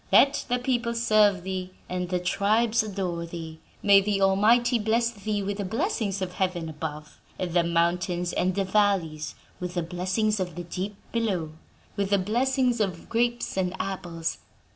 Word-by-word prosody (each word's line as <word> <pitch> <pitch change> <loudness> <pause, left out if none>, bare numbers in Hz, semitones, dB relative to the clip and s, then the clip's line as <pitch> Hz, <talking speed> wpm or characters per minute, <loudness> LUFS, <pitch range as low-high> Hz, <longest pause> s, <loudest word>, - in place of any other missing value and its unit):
Let 275 0 +5
the 245 - +2
people 245 -2 -1
serve 210 -5 +4
thee 185 -1 -4
and 180 -1 -3
the 180 -1 0
tribes 215 +5 +2
adore 185 -5 -3
thee. 165 -1 -7 0.2
May 200 -1 +7
the 200 0 0
Almighty 225 +6 +4
bless 230 +2 +1
thee 210 -2 -3
with 200 +1 -3
the - - 0
blessings 215 - -1
of 180 -1 -4
heaven 180 -3 -1
above, 150 -1 -7 0.2
and 180 -3 -3
the 175 -1 +4
mountains 175 +1 0
and 185 0 +1
the 200 - +1
valleys 190 -6 +1 0.2
with 180 0 -5
the 175 - 0
blessings 185 +5 0
of 180 -3 -3
the 175 - -5
deep 185 +4 -4 0.2
below, 195 -9 -1 0.5
with 200 -1 0
the 200 - +4
blessings 245 +5 +1
of 185 -5 -2
grapes 240 +1 0
and 185 0 -1
apples! 170 -4 -3
195 Hz, 165 wpm, -26 LUFS, 175-215 Hz, 0.5 s, May